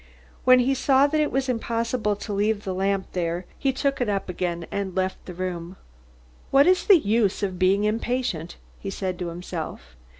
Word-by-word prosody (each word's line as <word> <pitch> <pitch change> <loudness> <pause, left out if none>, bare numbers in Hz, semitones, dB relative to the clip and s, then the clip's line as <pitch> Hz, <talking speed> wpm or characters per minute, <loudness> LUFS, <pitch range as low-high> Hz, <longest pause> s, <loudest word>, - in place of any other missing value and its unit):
When 255 0 +8
he 265 +2 +2
saw 270 +1 +4
that 305 +1 +1
it 300 - 0
was 270 0 0
impossible 230 -2 -1
to 205 +1 -6
leave 205 +1 0
the 190 - -3
lamp 195 +1 -1
there 175 0 -2
he 275 - +2
took 275 0 -1
it 240 - +1
up 195 -2 -2
again 170 -1 -2
and 195 -2 -3
left 190 0 -1
the 180 - -6
room. 180 -1 -4 0.7
"What 275 +1 +6
is 365 +1 +3
the 395 - +9
use 210 - +1
of 185 -3 -2
being 195 +2 +3
impatient?" 215 -6 -1 0.2
he 195 - -5
said 185 -2 -3
to 180 - -3
himself. 165 - -6
200 Hz, 190 wpm, -25 LUFS, 185-250 Hz, 0.7 s, the